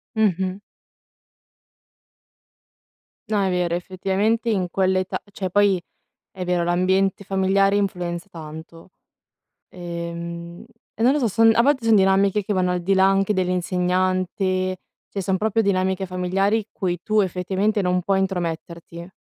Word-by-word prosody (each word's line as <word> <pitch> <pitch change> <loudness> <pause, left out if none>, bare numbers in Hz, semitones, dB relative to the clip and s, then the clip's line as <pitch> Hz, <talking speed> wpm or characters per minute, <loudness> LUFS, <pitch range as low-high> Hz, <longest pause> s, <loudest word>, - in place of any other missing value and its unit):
Mh-mh. 190 -3 +1 2.7
No 210 -2 +2
è 190 - +1
vero, 180 -1 0
effettivamente 195 +6 -1
in 190 -5 0
quell'età 185 0 0
cioè 190 -2 -4
poi 205 0 +3 0.5
è 185 -2 -6
vero 180 -1 +1
l'ambiente 190 +3 +1
familiare 195 +1 +2
influenza 180 -3 -2
tanto. 160 +2 -10 0.8
Ehm, 170 +1 -7 0.3
e - - -5
non 250 +3 +5
lo 300 - +1
so, 240 - +1
son 225 +2 +5
a 235 - +4
volte 270 -3 +1
son 225 - +5
dinamiche 195 +1 +3
che 205 - -2
vanno 185 -2 +1
al 180 -1 -2
di 190 +3 +1
là 190 0 +5
anche 195 +1 +2
dell'insegnante, 185 0 0 0.3
cioè 200 - -4
son 190 0 0
proprio 220 +2 +1
dinamiche 190 -1 0
familiari 190 +4 0
cui 175 -2 -3
tu 215 0 +2
effettivamente 190 +3 0
non 180 -1 +1
puoi 195 +1 +1
intrometterti. 170 -2 -4
185 Hz, 135 wpm, -22 LUFS, 180-200 Hz, 2.7 s, non